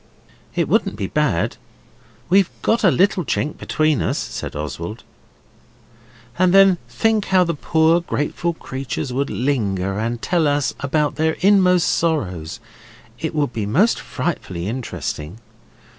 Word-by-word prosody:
'It - - +1
wouldn't - - +1
be 100 - -3
bad. 115 - 0 0.7
We've 190 0 +4
got 230 +1 +2
a 190 - +6
little 185 +1 +2
chink 150 0 -2
between 155 -3 +1
us,' - - 0
said - - -5
Oswald. 85 +8 -5 1.4
'And 185 0 +4
then 195 -2 +6
think 220 -2 +1
how 185 -1 +4
the 170 -1 -1
poor 160 +3 +2
grateful 170 +1 -2
creatures 130 -3 -5
would 140 +2 -1
linger 100 -7 -1
and 115 +2 -2
tell 170 +3 +1
us 145 -3 +1
about 145 +1 0
their 160 0 +2
inmost 185 -2 +4
sorrows. 95 - -1 0.6
It 160 -1 -3
would 145 -5 0
be 105 -3 -2
most 190 - +3
frightfully 95 - -4
interesting. 105 - -5
150 Hz, 135 wpm, -20 LUFS, 115-175 Hz, 1.4 s, a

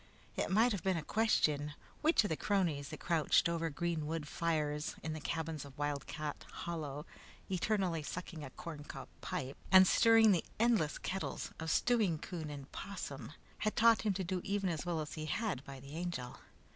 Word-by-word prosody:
It - - 0
might 225 +5 +4
have 200 -5 -1
been 190 -2 +1
a 160 - -3
question 150 -9 +2 0.3
which 315 -5 +5
of 205 - -1
the 160 - +1
cronies 165 -8 0
that - - -7
crouched 165 -2 +3
over 165 -1 0
green 160 0 -2
wood 160 -1 -3
fires 150 -2 -1
in 155 - -2
the 155 - -4
cabins 160 0 -3
of 140 -1 -12
Wildcat 145 +1 -3
Hollow, 150 -3 -4 0.5
eternally 185 -3 +1
sucking 165 0 -6
a 140 - -6
corncob 150 +1 -8
pipe 130 +1 -4
and 190 0 +10
stirring 225 0 +6
the 175 -4 +3 0.2
endless 225 -10 +3
kettles 190 +1 -3
of 160 0 -3
stewing 215 -9 +3
coon 160 -1 -5
and 145 -1 -6
opossum, 140 - -6 0.3
had 215 - 0
taught 230 0 +6
him 210 -3 +1
to 190 0 -2
do 185 0 -2
even 195 -2 0
as 165 +1 -4
well 165 -2 0
as 150 - -6
he 155 0 -4
had 205 - -1
by 135 -1 -8
the 140 +3 -10
Angel. 165 -8 -4
165 Hz, 185 wpm, -35 LUFS, 150-195 Hz, 0.5 s, and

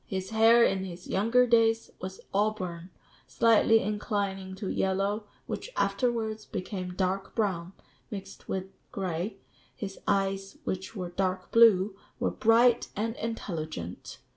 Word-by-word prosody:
His 190 +1 -4
hair 225 +2 +6
in 190 -3 +2
his 180 -1 -8
younger 230 +6 +3
days 225 -1 +3
was 190 +1 -6
auburn, 190 -4 -1 0.4
slightly 225 0 +4
inclining 200 -2 -2
to 195 +1 -5
yellow, 195 +3 0 0.2
which - - -5
afterwards 220 +1 0
became 185 -1 -5
dark 190 +1 -1
brown, 185 -5 -1 0.4
mixed 195 -2 -8
with 190 0 -3 0.2
gray; 185 +1 -3 0.4
his 195 +4 -6
eyes, 195 0 0
which 190 +4 -4
were 180 -3 -4
dark 185 0 -2
blue, 210 -4 +6 0.2
were - - +1
bright 235 +2 +4
and 225 +3 -2
intelligent. 155 - -5
195 Hz, 125 wpm, -29 LUFS, 185-225 Hz, 0.4 s, hair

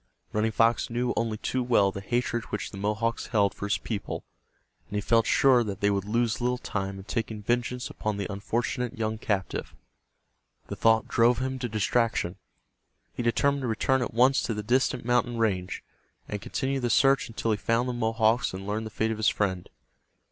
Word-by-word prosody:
Running 110 +1 +1
Fox 115 +1 +2
knew 120 +1 0
only 115 -2 -1
too 130 +4 -1
well 115 -6 +3
the 100 - -6
hatred 120 +1 -1
which 105 - -4
the 100 - -8
Mohawks 110 +3 -1
held 100 -4 +2
for 100 - -5
his 100 - +1
people, 105 -4 -5 0.6
and 105 - -7
he - - +1
felt 115 0 +3
sure 130 0 +5
that 100 -3 -5
they 100 0 +2
would 100 -1 -1
lose 115 +2 0
little 125 +1 +1
time 95 -4 -4
in 95 - -9
taking 110 +1 -3
vengeance 120 +2 -1
upon 110 -1 -3
the 100 - -2
unfortunate 115 +4 -2
young 110 -1 -2
captive. 100 -5 -2 0.9
The - - -4
thought 110 -1 +3
drove 120 +1 +3
him 130 +1 -2
to 120 -1 -3
distraction. 110 -3 0 0.8
He - - -4
determined 140 +4 +2
to 130 - -2
return 130 +4 +1
at 120 - -2
once 130 +4 +4
to 115 - -2
the 105 - -4
distant 125 +1 +1
mountain 120 -1 +1
range, 95 -5 -1 0.4
and 105 -1 -4
continue 135 0 -2
the 120 -2 -1
search 135 +3 +4
until 115 -1 -2
he 105 - +1
found 115 +4 +1
the 125 - -1
Mohawks 115 -2 +1
and 95 +1 -7
learned 110 +2 -2
the - - -7
fate 110 +1 -1
of 110 - -3
his 110 0 +3
friend. 95 -4 -1
115 Hz, 195 wpm, -27 LUFS, 105-120 Hz, 0.9 s, sure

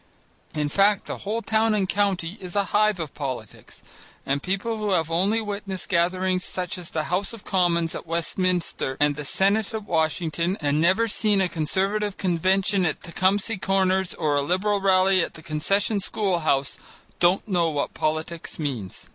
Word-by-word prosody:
In 150 -1 0
fact, 200 +6 +3
the - - -5
whole 225 +3 -3
town 220 0 +2
and 195 -2 +1
county 190 -3 0
is 180 0 -7
a 200 - +3
hive 210 -2 +3
of 155 -5 -5
politics, 130 -7 -7 0.4
and 140 +1 0
people 200 +6 -2
who 210 -1 -2
have 165 -2 0
only 195 +7 +2
witnessed 200 -3 -5
gatherings 185 +1 +1
such 180 -1 -4
as 175 - -6
the 155 - -2
House 195 +5 0
of 230 - -10
Commons 170 -3 +1
at - - -7
Westminster 170 -4 -1
and 145 0 +3
the 150 - -5
Senate 200 +8 +1
at 220 - -4
Washington 165 +1 0
and 145 0 +1
never 190 +7 +3
seen 210 -1 +2
a 190 - +3
Conservative 195 +6 -1
Convention 190 +2 +1
at 160 - -1
Tecumseh 190 +4 0
Corners 190 0 +1
or 150 -3 0
a 145 - +2
Liberal 195 +6 0
Rally 190 -1 +4
at - - -6
the 160 - -11
Concession 195 +8 0
school 195 -2 0
house, 140 -4 0 0.4
don't 180 +4 +3
know 175 -5 +2
what 145 -2 -2
politics 155 +2 -3
means. 125 - -5
185 Hz, 170 wpm, -24 LUFS, 160-200 Hz, 0.4 s, Rally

